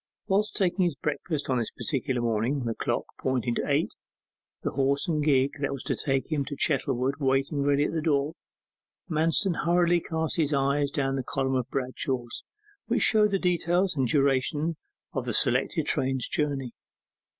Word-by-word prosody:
Whilst 210 +1 +1
taking 190 -1 +2
his 170 -5 0
breakfast 150 +1 -3
on 130 -2 +1
this 115 - -2
particular 130 -4 -2
morning, 120 +4 0
the 115 - -1
clock - - -2
pointing 125 -2 0
to - - -2
eight, - - +1 0.7
the - - -1
horse 140 +5 +1
and 155 -3 0
gig 135 -2 +3
that 145 - -1
was 140 - -5
to - - -1
take 135 +1 -1
him 150 -2 +1
to 145 - -5
Chettlewood 135 -2 +1
waiting 135 +1 +1
ready 140 +1 +3
at - - -1
the 160 - -1
door, 150 -1 +1 0.7
Manston 165 +3 +2
hurriedly 175 0 +3
cast 160 -1 -2
his 155 -2 +1
eyes 140 +1 +1
down 135 -1 -1
the 130 - -2
column 135 +1 -1
of 130 -2 -1
Bradshaw 130 -1 -2 0.6
which - - +2
showed 215 -1 +5
the 195 - +1
details 180 0 +1
and 135 -3 +1
duration 145 +4 +1 0.4
of - - -2
the - - -2
selected - - +2
train's 130 -1 0
journey. 140 -5 -1
140 Hz, 170 wpm, -27 LUFS, 135-165 Hz, 0.7 s, showed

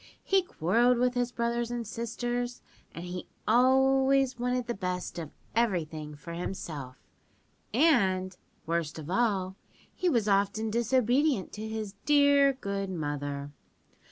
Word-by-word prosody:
He 390 0 +3
quarrelled 240 - +2
with 250 +1 +2
his 245 -1 -1
brothers 235 0 -1
and 240 -1 -3
sisters, 240 +2 -3 0.3
and 170 - -8
he 180 0 -6 0.2
always 265 +2 +4
wanted 250 0 0
the 240 - -2
best 180 -3 -4
of 160 -3 -6 0.3
everything 160 -9 -1
for 170 +3 -9
himself, 160 -7 -5 0.8
and, 195 - +3 0.3
worst 165 -2 -2
of 160 +1 -7
all, 195 -4 0 0.4
he 365 - 0
was 235 -8 +1
often 200 +2 +1
disobedient 245 +1 +2
to 215 +1 -5
his 220 -2 -4
dear 285 -1 +5
good 200 -6 -4
mother. 145 -4 -4
225 Hz, 130 wpm, -29 LUFS, 180-250 Hz, 0.8 s, dear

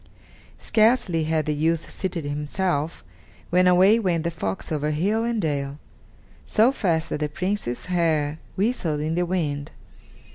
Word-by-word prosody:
Scarcely 215 -8 +2
had 155 -1 0
the 150 - 0
youth 160 +2 0
seated 175 -5 -3
himself, 150 +2 -2 0.5
when 180 +1 +4
away 190 +5 +6
went 175 -6 0
the 170 - -1
fox 100 - -4
over 150 -1 0
hill 195 +9 +1
and 235 -1 -1
dale, 140 -5 -2 0.7
so 225 +4 +4
fast 170 -11 0
that - - -2
the 150 0 -1
Prince's 180 -7 -3
hair 160 -4 0 0.2
whistled 190 -8 0
in 155 +2 -1
the 175 +1 0
wind. 150 -6 -2
165 Hz, 145 wpm, -24 LUFS, 150-190 Hz, 0.7 s, away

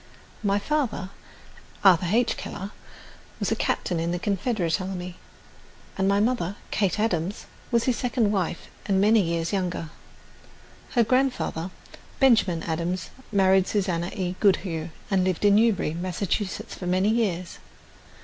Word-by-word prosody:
My 200 -1 +2
father, 220 -6 -1 0.7
Arthur 185 -3 +6
H. 235 +2 +2
Keller, 195 +2 -6 0.7
was - - -1
a - - +3
captain 175 -3 -1
in 165 +1 -1
the 175 - -1
Confederate 195 -2 0
Army, 180 -1 -5 0.8
and 190 0 +1
my 200 +1 +3
mother, 210 -4 0 0.2
Kate 200 -1 +1
Adams, 190 -3 -1 0.2
was 235 -2 +2
his 250 -3 +1
second 240 -4 +1
wife 185 -4 -2 0.2
and 195 -2 +2
many 215 +2 +5
years 165 0 -1
younger. 180 -4 -2 1.0
Her 240 - +5
grandfather, 250 -8 0 0.5
Benjamin 220 -11 +4
Adams, 170 +3 -2 0.2
married 190 -2 +4
Susanna 180 -4 0
E. 180 -1 -2
Goodhue, 180 -5 +1 0.2
and 190 -1 +3
lived 185 +1 0
in 205 - +6
Newbury, 210 -7 +3
Massachusetts, 185 +3 -3
for 180 - -6
many 185 +3 +2
years. 190 -6 -1
190 Hz, 135 wpm, -25 LUFS, 175-215 Hz, 1.0 s, Arthur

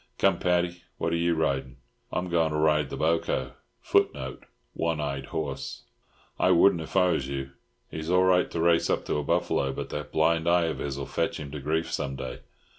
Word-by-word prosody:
Come, - - +3
Paddy, 90 0 +1 0.2
what 85 - -1
are - - +3
you 85 0 +1
riding?" 70 -4 -1 0.3
"I'm 90 - -2
going 85 -2 +3
to - - 0
ride 75 -2 +2
the - - -5
boco." 80 +1 0 1.2
One 80 -2 -1
eyed 70 -2 -3
horse. 70 -3 -4 0.6
"I - - +4
wouldn't 85 0 +5
if 80 - -4
I 90 -1 +5
was 70 -5 -1
you. 70 -1 -4 0.4
He's 80 +1 -5
all 90 +1 +4
right 90 -1 +3
to 85 - -4
race 85 0 +3
up - - 0
to - - -1
a 75 - -1
buffalo, 70 -1 +1
but - - -5
that - - -5
blind 80 +1 +2
eye 85 0 +4
of 80 - -3
his'll 70 -1 -3
fetch - - -2
him 70 -2 -7
to 75 - -5
grief 80 +4 -1
some 70 -1 -2
day. 65 -2 -6
80 Hz, 195 wpm, -27 LUFS, 70-85 Hz, 1.2 s, wouldn't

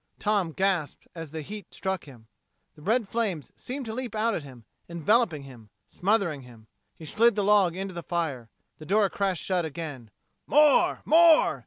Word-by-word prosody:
Tom 205 -5 0
gasped 185 -3 -1
as 165 -2 -8
the 160 +1 -6
heat 205 +3 -9
struck 190 -1 -3
him. 125 -6 -15 0.5
The 150 - -18
red 220 +5 +1
flames 195 - -3
seemed 265 +1 -6
to 220 - -5
leap 245 -2 -5
out 225 +2 +1
at 170 - -2
him, 125 -5 -13 0.2
enveloping 170 - +1
him, 120 -6 -14 0.2
smothering 185 -7 0
him. 120 -3 -15 0.3
He 160 - -11
slid 230 +7 +3
the 205 - 0
log 195 -4 +3
into 190 0 -5
the 170 - -5
fire. 155 -10 -3 0.3
The 155 - -10
door 200 0 +2
crashed 195 -4 -1
shut 185 -2 0
again. 145 -7 -7 0.4
"More! 300 0 +4
More!" 330 0 +5
185 Hz, 175 wpm, -27 LUFS, 155-215 Hz, 0.5 s, More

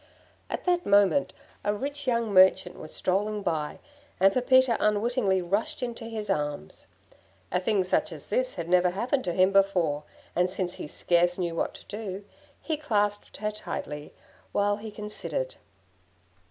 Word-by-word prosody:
At - - -4
that 355 -1 +2
moment 205 - +4 0.3
a 205 0 +1
rich 285 +4 -4
young 235 -3 +1
merchant 185 -1 +5
was 155 - -9
strolling 205 +3 -1
by, 155 -4 -2 0.4
and 195 +1 +5
Pepita 260 -1 +4
unwittingly 210 -2 +2
rushed 200 +8 -1
into 235 -1 -4
his 220 -2 -5
arms. 145 - -3 0.6
A - - +2
thing 195 +1 +1
such 185 - +1
as - - -8
this - - -1
had 165 - -4
never 180 0 +4
happened 245 +8 -1
to 175 - -1
him 185 +2 +4
before, 185 -7 +2 0.3
and 180 +1 +2
since 180 -1 -2
he - - -5
scarce 175 +3 +2
knew 175 -3 -1
what 165 - -2
to - - -13
do, 205 -2 -6 0.4
he 315 -2 -1
clasped 205 -8 -1
her 210 0 -2
tightly 150 -8 -6 0.4
while 205 0 +2
he 220 +1 -7
considered. 210 -10 -4
200 Hz, 155 wpm, -27 LUFS, 180-225 Hz, 0.6 s, merchant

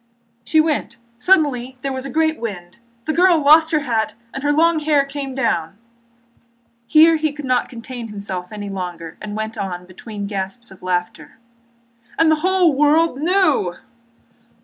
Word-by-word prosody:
"She 315 - +2
went. 310 -1 0 0.2
Suddenly 265 -6 +2
there 275 -1 -2
was 260 +1 -4
a - - -7
great 315 0 +1
wind. 190 -5 -7 0.3
The 310 - -1
girl 355 -1 +4
lost 310 +2 +6
her 310 -2 +1
hat 225 -5 -1 0.2
and 270 - -5
her 290 +1 +1
long 325 +2 +3
hair 295 -2 +2
came 275 -1 -6
down...." 200 -8 -1 1.1
Here 320 +3 +6
he 310 -1 0
could 295 0 -8 0.2
contain 235 0 -8
himself 195 -4 -6
no 215 - -9
longer 180 -4 -6
and 210 -1 -6
went 220 +1 -4
on, 180 -2 -4
between 200 +3 -8
gasps 200 +3 -5
of 190 - -15
laughter: 180 -1 -3 0.8
"And 325 -1 +4
the 315 - +3
whole 370 -3 +3
world 295 +1 +3
knew...." 310 - +2
265 Hz, 155 wpm, -20 LUFS, 200-315 Hz, 1.1 s, lost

